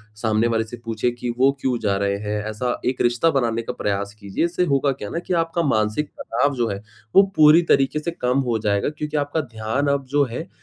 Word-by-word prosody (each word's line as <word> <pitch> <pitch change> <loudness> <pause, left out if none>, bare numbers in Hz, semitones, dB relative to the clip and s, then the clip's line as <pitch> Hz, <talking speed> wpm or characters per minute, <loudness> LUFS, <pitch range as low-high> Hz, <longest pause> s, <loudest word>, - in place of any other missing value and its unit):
सामने 110 +1 +1
वाले 115 -1 +1
से 110 +2 -9
पूछें 115 +1 0
कि 120 0 -4
वो 135 +2 +5
क्यों 130 -2 0
जा 100 -3 0
रहे 100 0 0
हैं? 105 0 -3
ऐसा 120 +3 -2
एक 130 0 0
रिश्ता 120 +7 +3
बनाने 120 -5 0
का 115 - -5
प्रयास 100 0 -2
कीजिए 100 +9 -1
इससे 175 +1 0
होगा 140 -2 +2
क्या 105 -6 -6
ना 170 - -3
कि 180 - -4
आपका 165 +1 -1
मानसिक 110 +1 0
तनाव 140 +5 0
जो 120 -2 0
है 100 0 -4 0.3
वो 195 - +9
पूरी 155 +2 +7
तरीके 135 +2 +3
से 170 +3 -3
कम 125 -5 0
हो 115 -2 +1
जाएगा 100 +1 0
क्योंकि 150 0 -4
आपका 145 +2 0
ध्यान 110 +6 -1
अब 140 -1 -2
जो 145 - +5
है, 160 +9 -5
125 Hz, 225 wpm, -22 LUFS, 110-145 Hz, 0.3 s, वो